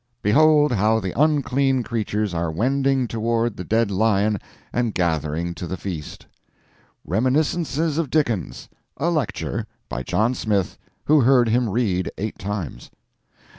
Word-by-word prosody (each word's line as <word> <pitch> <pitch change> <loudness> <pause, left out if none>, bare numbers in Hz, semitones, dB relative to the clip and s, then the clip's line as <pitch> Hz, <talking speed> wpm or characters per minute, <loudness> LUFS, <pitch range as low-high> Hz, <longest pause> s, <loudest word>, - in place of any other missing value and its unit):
Behold 150 +6 +5
how 110 0 +2
the 95 -3 -3
unclean 140 -3 +2
creatures 105 -3 -2
are 85 -1 -1
wending 135 +8 +1
toward 115 0 -1
the 90 - -6
dead 110 +2 +1
lion 105 0 +2 0.3
and 120 -3 0
gathering 85 -1 -1
to 90 - -6
the 95 - -4
feast: 85 -6 -7 0.8
"Reminiscences 150 - 0
of 160 -5 -1
Dickens." 120 - -1 0.3
A 165 +5 0
lecture. 155 -9 -2 0.2
By 65 - -3
John 110 - +1
Smith, 105 -6 -1 0.3
who 150 -1 +5
heard 125 -2 +4
him 120 0 +2
read 95 -4 0
eight 110 +2 -4
times. 100 -6 -5
115 Hz, 130 wpm, -22 LUFS, 95-135 Hz, 0.8 s, Behold